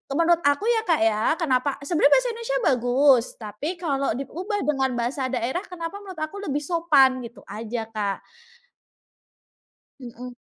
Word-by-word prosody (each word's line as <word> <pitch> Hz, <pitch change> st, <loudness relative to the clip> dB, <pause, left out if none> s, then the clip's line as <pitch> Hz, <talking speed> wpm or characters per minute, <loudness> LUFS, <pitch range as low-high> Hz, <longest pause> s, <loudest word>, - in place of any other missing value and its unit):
menurut 335 Hz, +1 st, +3 dB
aku 285 Hz, +8 st, +2 dB
ya 460 Hz, -1 st, +3 dB
Kak 320 Hz, -, +3 dB
ya, 215 Hz, 0 st, +1 dB
kenapa 270 Hz, -4 st, +1 dB
sebenarnya 310 Hz, -2 st, +3 dB
bahasa -, -, +2 dB
Indonesia 470 Hz, +2 st, -2 dB
bagus, 250 Hz, 0 st, +4 dB
tapi 215 Hz, +7 st, -5 dB
kalau 275 Hz, -5 st, -1 dB
diubah 370 Hz, -, -4 dB
dengan 270 Hz, -3 st, +1 dB
bahasa 260 Hz, +3 st, -1 dB
daerah, 255 Hz, +7 st, -2 dB
kenapa 360 Hz, +2 st, -6 dB
menurut 380 Hz, -4 st, -10 dB
aku 355 Hz, +6 st, -5 dB
lebih 295 Hz, -5 st, -2 dB
sopan 285 Hz, -6 st, +3 dB
gitu 235 Hz, 0 st, -10 dB
aja 225 Hz, +2 st, -4 dB
Kak. 205 Hz, -2 st, -2 dB, 1.8 s
Mhm. 245 Hz, 0 st, -9 dB
275 Hz, 145 wpm, -24 LUFS, 245-340 Hz, 1.8 s, bagus